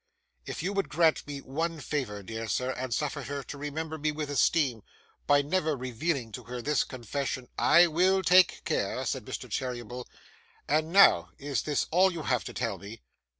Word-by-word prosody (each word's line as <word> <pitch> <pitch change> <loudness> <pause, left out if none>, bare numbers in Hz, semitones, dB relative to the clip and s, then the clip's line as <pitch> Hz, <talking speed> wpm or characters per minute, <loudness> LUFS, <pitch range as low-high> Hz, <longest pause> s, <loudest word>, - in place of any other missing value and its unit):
'If - - -5
you 195 - -1
would 200 -1 -1
grant 160 -1 +2
me 140 -1 -6
one 165 +5 -3
favour, 125 -10 -3
dear 115 +3 -5
sir, 125 +5 0
and 130 -1 -5
suffer 145 +3 -1
her 140 0 -5
to 145 - -8
remember 155 +2 -4
me 155 +1 0
with 150 -1 -4
esteem, 135 -3 +2 0.5
by 145 0 +5
never 155 -1 0
revealing 130 0 -2
to - - -8
her 125 0 -6
this 145 +3 +1
confession 130 +1 -4
' - - -41
'I 170 +2 +7
will 185 +4 +2
take 180 +1 +5
care,' - - -1
said - - -2
Mr. - - -6
Cheeryble. 125 -1 -4 0.6
'And 155 +2 +1
now, 170 - +6
is 140 -1 -2
this 150 -1 0
all 185 +3 +5
you 165 -3 -5
have 125 -4 0
to - - -6
tell 115 -6 -2
me? 100 - -10
145 Hz, 190 wpm, -29 LUFS, 125-160 Hz, 0.6 s, I